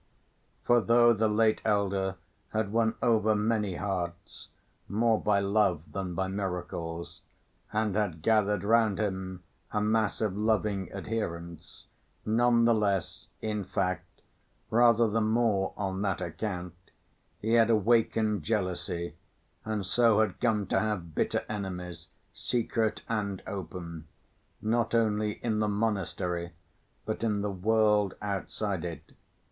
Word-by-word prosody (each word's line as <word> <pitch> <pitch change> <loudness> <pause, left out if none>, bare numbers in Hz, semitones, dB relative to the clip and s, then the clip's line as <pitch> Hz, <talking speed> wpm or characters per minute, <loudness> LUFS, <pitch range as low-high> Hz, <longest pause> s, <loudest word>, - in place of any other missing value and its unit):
For 120 -1 +4
though 120 +1 +5
the 110 0 +2
late 110 +1 +2
elder 100 -2 +1 0.4
had 110 -2 0
won 115 0 +2
over 110 -3 +3
many 105 -3 0
hearts, 90 -4 -4 0.4
more 110 +2 +2
by 100 -2 +2
love 100 -5 +2
than 95 -3 -4
by 95 +2 0
miracles, 90 -3 -4 0.5
and 110 -2 0
had 90 -7 -1
gathered 105 -1 +2
round 110 -1 +3
him 95 -3 -3 0.3
a 105 - 0
mass 110 0 +1
of 105 -4 -1
loving 105 -3 0
adherents, 85 -5 -5 0.4
none 115 +1 +3
the 120 - +5
less, 100 -4 -1 0.2
in 105 -2 -1
fact, 90 0 -3 0.5
rather 115 0 +5
the 110 +1 0
more 110 -3 +2
on 95 -1 -2
that 95 -2 0
account 90 -1 -4 0.7
he 110 - -2
had 115 -1 +5
awakened 110 -2 +2
jealousy 90 -3 -2 0.5
and 110 -3 -2
so 115 +1 +4
had 105 -4 -1
come 110 -4 +1
to - - +1
have 100 -7 -2
bitter - - 0
enemies, 90 -5 -5 0.3
secret 115 -2 -1
and 100 -4 -2
open, 85 -4 -6 0.6
not 115 +2 +1
only 105 -2 +2
in 110 -2 0
the 105 - +1
monastery 95 -5 -1 0.5
but 105 - -3
in 105 -3 +1
the 105 0 -1
world 105 0 +2
outside 100 -2 -3
it. 85 -2 -7
105 Hz, 130 wpm, -29 LUFS, 95-110 Hz, 0.7 s, though